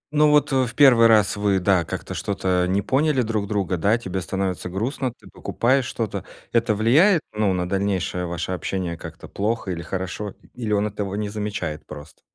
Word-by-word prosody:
Ну 150 Hz, 0 st, +5 dB
вот, 150 Hz, -1 st, +3 dB
э, 130 Hz, -2 st, +3 dB
в 115 Hz, -, -9 dB
1 125 Hz, -5 st, +7 dB
раз 105 Hz, -2 st, +4 dB
вы, 100 Hz, -2 st, +2 dB
да, 95 Hz, -1 st, +3 dB
как-то -, -, -5 dB
что-то 95 Hz, -4 st, 0 dB
не 95 Hz, +1 st, +1 dB
поняли 135 Hz, -1 st, +2 dB
друг 110 Hz, -2 st, -2 dB
друга, 95 Hz, -3 st, -1 dB
да, 100 Hz, +7 st, +2 dB
тебе 95 Hz, -5 st, -4 dB
становится 95 Hz, -1 st, -3 dB
грустно, 125 Hz, +7 st, -2 dB
ты -, -, -19 dB
покупаешь 130 Hz, +2 st, 0 dB
что-то. 115 Hz, -4 st, -3 dB, 0.3 s
Это 115 Hz, -2 st, +2 dB
влияет, 155 Hz, -, +4 dB
ну, 105 Hz, -2 st, +1 dB
на 90 Hz, -1 st, -1 dB
дальнейшее 95 Hz, -2 st, -1 dB
ваше 85 Hz, +1 st, -4 dB
общение 90 Hz, 0 st, -3 dB
как-то -, -, -10 dB
плохо 105 Hz, -1 st, -2 dB
или 85 Hz, -1 st, -4 dB
хорошо? 95 Hz, +3 st, -5 dB, 0.2 s
И 125 Hz, -, -9 dB
или 105 Hz, -, -2 dB
он 105 Hz, 0 st, +2 dB
этого 105 Hz, -1 st, -3 dB
не 105 Hz, 0 st, -2 dB
замечает 100 Hz, -7 st, -4 dB
прост? 75 Hz, +1 st, -11 dB
100 Hz, 190 wpm, -23 LUFS, 95-115 Hz, 0.3 s, 1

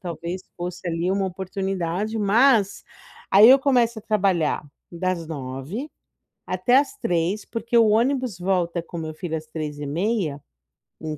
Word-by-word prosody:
talvez 175 Hz, +1 st, -5 dB
fosse 175 Hz, 0 st, -6 dB
ali 170 Hz, +2 st, -1 dB
uma 195 Hz, 0 st, 0 dB
oportunidade. 190 Hz, +2 st, -3 dB
Mas 215 Hz, 0 st, +3 dB, 0.5 s
aí 205 Hz, +4 st, +8 dB
eu 270 Hz, -, +8 dB
começo 245 Hz, -4 st, +2 dB
a -, -, -11 dB
trabalhar 190 Hz, -9 st, +1 dB, 0.3 s
das 175 Hz, -1 st, -2 dB
9, 145 Hz, -, -6 dB, 0.6 s
até 185 Hz, +8 st, +2 dB
às 295 Hz, +9 st, -1 dB
3, 175 Hz, -, -1 dB
porque 235 Hz, 0 st, 0 dB
o 225 Hz, -, +6 dB
ônibus 240 Hz, -2 st, +1 dB
volta 175 Hz, -2 st, 0 dB
com 170 Hz, 0 st, -8 dB
meu 155 Hz, -1 st, -5 dB
filho 160 Hz, -1 st, -4 dB
às 155 Hz, 0 st, -7 dB
3 155 Hz, -2 st, -5 dB
e 145 Hz, -, -5 dB
meia, 165 Hz, -2 st, -1 dB, 0.6 s
em 155 Hz, -1 st, -4 dB
185 Hz, 150 wpm, -23 LUFS, 165-220 Hz, 0.6 s, aí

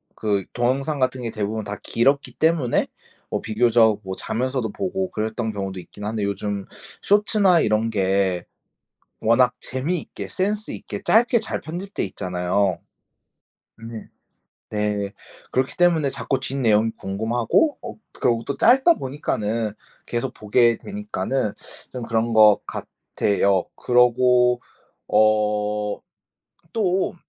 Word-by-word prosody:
그 100 Hz, -3 st, -1 dB
동영상 135 Hz, +4 st, 0 dB
같은 130 Hz, 0 st, 0 dB
게 115 Hz, -, -3 dB
대부분 110 Hz, 0 st, -3 dB
다 105 Hz, -, -4 dB
길었기 140 Hz, +4 st, +1 dB
때문에 160 Hz, -6 st, +2 dB, 0.4 s
뭐 -, -, -2 dB
비교적 110 Hz, -1 st, +3 dB
뭐 95 Hz, 0 st, -4 dB
자면서도 120 Hz, 0 st, -2 dB
보고 190 Hz, -, -3 dB
그랬던 110 Hz, -1 st, -2 dB
경우도 95 Hz, -2 st, -4 dB
있긴 105 Hz, +3 st, -10 dB
한데 105 Hz, -1 st, -2 dB
요즘 100 Hz, 0 st, -2 dB, 0.4 s
숏츠나 205 Hz, -3 st, +4 dB
이런 110 Hz, +1 st, +1 dB
게 95 Hz, -3 st, +1 dB, 0.8 s
워낙 125 Hz, +2 st, +4 dB
재미있게 150 Hz, +7 st, -4 dB
센스 205 Hz, +3 st, -2 dB
있게 -, -, -7 dB
짧게 235 Hz, +2 st, +4 dB
잘 220 Hz, -, -3 dB
편집돼 185 Hz, +5 st, -5 dB
있잖아요. 90 Hz, 0 st, -1 dB, 1.0 s
네. 115 Hz, -1 st, -9 dB, 0.6 s
네. 105 Hz, -1 st, -1 dB, 0.4 s
그렇기 130 Hz, +1 st, 0 dB
때문에 165 Hz, -5 st, +3 dB
자꾸 135 Hz, 0 st, -2 dB
뒷내용이 115 Hz, -5 st, +1 dB
궁금하고 115 Hz, -, +1 dB
어 235 Hz, -, -6 dB, 0.2 s
그러고 115 Hz, -1 st, +1 dB
또 140 Hz, -, -3 dB
짧다 270 Hz, +7 st, +5 dB
보니까는 115 Hz, -, -2 dB, 0.3 s
계속 120 Hz, +2 st, -3 dB
보게 115 Hz, +2 st, +3 dB
되니까는 200 Hz, -, -3 dB, 0.4 s
좀 125 Hz, -2 st, -5 dB
그런 115 Hz, 0 st, 0 dB
거 105 Hz, -2 st, +7 dB
같아요. 100 Hz, -2 st, -1 dB
그러고 125 Hz, 0 st, +4 dB, 0.5 s
어 105 Hz, -1 st, +1 dB, 0.7 s
또 190 Hz, -5 st, 0 dB
115 Hz, 255 characters per minute, -23 LUFS, 105-140 Hz, 1.0 s, 거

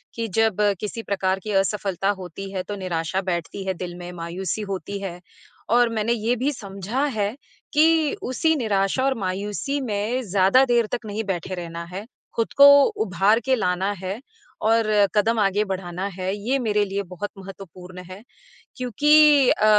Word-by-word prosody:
कि 230 Hz, 0 st, -2 dB
जब 225 Hz, -3 st, +3 dB, 0.2 s
किसी 225 Hz, +2 st, -5 dB
प्रकार 190 Hz, -1 st, 0 dB
की 215 Hz, -, -4 dB
असफलता 195 Hz, -1 st, -2 dB
होती 195 Hz, +2 st, -7 dB
है, 185 Hz, -, -2 dB
तो 205 Hz, -, -6 dB
निराशा 185 Hz, -1 st, -2 dB
बैठती 175 Hz, +3 st, -4 dB
है 190 Hz, -, 0 dB
दिल 175 Hz, 0 st, -6 dB
में, 175 Hz, 0 st, -8 dB
मायूसी 175 Hz, +4 st, -4 dB
होती 195 Hz, +2 st, -4 dB
है 180 Hz, -3 st, -6 dB, 0.5 s
और 240 Hz, 0 st, +4 dB
मैंने 225 Hz, +1 st, 0 dB
ये 235 Hz, +1 st, 0 dB
भी 260 Hz, +5 st, 0 dB
समझा 200 Hz, +4 st, -4 dB, 0.2 s
है 205 Hz, +3 st, 0 dB, 0.4 s
कि 300 Hz, +2 st, +5 dB, 0.5 s
उसी 320 Hz, +5 st, +2 dB
निराशा 215 Hz, -1 st, 0 dB
और 270 Hz, -, +2 dB
मायूसी 205 Hz, +9 st, -2 dB
में 225 Hz, +2 st, -1 dB
ज़्यादा 195 Hz, +5 st, +4 dB
देर 235 Hz, -1 st, +4 dB
तक 235 Hz, -, -3 dB
नहीं 215 Hz, +1 st, -3 dB
बैठे 185 Hz, -1 st, -3 dB
रहना 170 Hz, -1 st, -6 dB
है, 200 Hz, +3 st, -6 dB, 0.3 s
खुद 230 Hz, -, -1 dB
को 280 Hz, -, +9 dB, 0.4 s
उभार 195 Hz, +4 st, +3 dB
के 265 Hz, -, +3 dB
लाना 190 Hz, -3 st, 0 dB
है 190 Hz, +4 st, -4 dB, 0.5 s
और 225 Hz, -1 st, +3 dB, 0.3 s
कदम 225 Hz, +2 st, +2 dB
आगे 200 Hz, 0 st, +2 dB
बढ़ाना 185 Hz, -1 st, -4 dB
है। 185 Hz, +1 st, -2 dB
ये 230 Hz, +7 st, -1 dB
मेरे 210 Hz, -3 st, +1 dB
लिए 200 Hz, +1 st, -3 dB
बहुत 185 Hz, +2 st, -6 dB
महत्वपूर्ण 185 Hz, -1 st, -10 dB
है, 185 Hz, +2 st, -10 dB, 0.6 s
क्योंकि 290 Hz, +3 st, +5 dB
अ, 215 Hz, -, +2 dB
200 Hz, 165 wpm, -23 LUFS, 185-230 Hz, 0.6 s, को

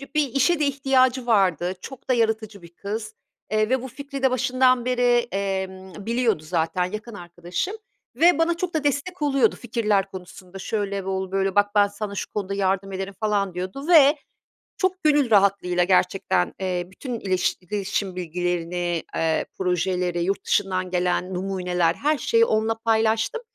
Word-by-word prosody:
Bir 300 Hz, -2 st, +3 dB
işe 305 Hz, +5 st, +3 dB
de 300 Hz, -, +2 dB
ihtiyacı 265 Hz, -2 st, +2 dB
vardı. 185 Hz, -6 st, +2 dB
Çok 265 Hz, -1 st, -11 dB
da -, -, +4 dB
yaratıcı 220 Hz, -4 st, -1 dB
bir 170 Hz, -, -13 dB
kız, 215 Hz, +3 st, -5 dB, 0.4 s
eee, 215 Hz, 0 st, +2 dB
ve 260 Hz, -1 st, +1 dB
bu 260 Hz, -, -6 dB
fikri 275 Hz, +1 st, -8 dB
de 265 Hz, -, +4 dB
başından 255 Hz, -1 st, +2 dB
beri, 245 Hz, -1 st, +2 dB
emm, 190 Hz, -1 st, -4 dB
biliyordu 230 Hz, -7 st, +1 dB
zaten, 165 Hz, +2 st, 0 dB
yakın 220 Hz, +2 st, -7 dB
arkadaşım 175 Hz, -, -5 dB, 0.4 s
ve 345 Hz, +1 st, +5 dB
bana 335 Hz, +1 st, +1 dB
çok 360 Hz, -1 st, -3 dB
da 310 Hz, -2 st, -1 dB
destek 290 Hz, +5 st, -1 dB
oluyordu 275 Hz, -6 st, +2 dB
fikirler 215 Hz, -5 st, 0 dB
konusunda. 185 Hz, 0 st, -10 dB
Şöyle 200 Hz, -1 st, -2 dB
ol 190 Hz, -1 st, -3 dB
böyle, 195 Hz, 0 st, 0 dB
bak 205 Hz, 0 st, +4 dB
ben 205 Hz, -1 st, +5 dB
sana 205 Hz, 0 st, -6 dB
bu 200 Hz, -, -5 dB
konuda 200 Hz, -2 st, -3 dB
yardım 195 Hz, 0 st, 0 dB
ederim 195 Hz, +1 st, -4 dB
falan 205 Hz, -3 st, 0 dB
diyordu. 185 Hz, -, -5 dB
Ve 300 Hz, -4 st, +7 dB, 0.6 s
çok 375 Hz, 0 st, -1 dB
gönül 290 Hz, -5 st, +3 dB
rahatlığıyla 195 Hz, -3 st, +3 dB
gerçekten, 180 Hz, -, +1 dB
eee, 180 Hz, -2 st, -1 dB
bütün 240 Hz, +4 st, -6 dB
ileş 185 Hz, -3 st, 0 dB
iletişim 195 Hz, 0 st, -3 dB
bilgilerini, 175 Hz, 0 st, -2 dB
eee, 160 Hz, -1 st, 0 dB
projeleri, 180 Hz, -1 st, 0 dB
yurt 195 Hz, +2 st, -1 dB
dışından 185 Hz, -2 st, 0 dB
gelen 180 Hz, +1 st, 0 dB
numuneler, 180 Hz, -2 st, 0 dB
her 300 Hz, +1 st, +1 dB
şeyi 460 Hz, +9 st, +3 dB
onunla 220 Hz, -, +1 dB
paylaştım. 225 Hz, -, +1 dB
200 Hz, 160 wpm, -24 LUFS, 185-255 Hz, 0.6 s, Ve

